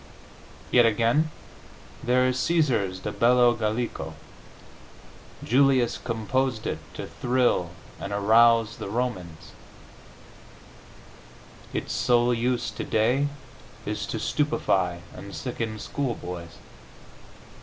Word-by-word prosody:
Yet 125 - +6
again, 115 +8 +2 0.7
there 125 +1 +3
is 130 0 0
Caesar's 125 - +1
"De 105 - -3
Bello 120 +2 +4
Gallico." 115 +1 -3 1.3
Julius 130 -2 +3
composed 115 +1 -1
it - - -2 0.2
to - - -5
thrill 125 -8 +1 0.3
and 100 - -5
arouse 115 +2 +4
the - - -6
Romans; 100 -8 -4 2.2
its - - -3
sole 120 0 +3
use 120 0 0
today 120 +7 +1 0.6
is 105 0 -3
to - - -3
stupefy 95 - 0
and 100 - -9
sicken 115 -4 -4
schoolboys. 90 -10 -5
115 Hz, 90 wpm, -26 LUFS, 105-125 Hz, 2.2 s, Yet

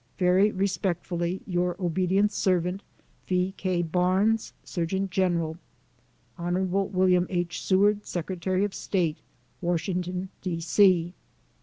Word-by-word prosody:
Very 185 +2 +4
respectfully, 185 -2 -2
your 180 -1 0
obdt. 185 +3 +1
servant, 180 -1 0 0.5
V. 185 +1 0
K. 185 -2 -1
BAKXES, 185 +6 +1
Surgeon 190 +2 -2
General. 170 -3 0 0.8
Hon. 175 +2 0
WM. 185 -2 +2
H. 175 -2 -2
SEWAKD, 205 +2 +3
Secretary 185 +2 -1
of 205 - -5
State, 170 -5 -1 0.4
Washington, 180 +1 -2
D. 175 -3 -3
C. 175 0 +3
180 Hz, 105 wpm, -27 LUFS, 175-190 Hz, 0.8 s, Very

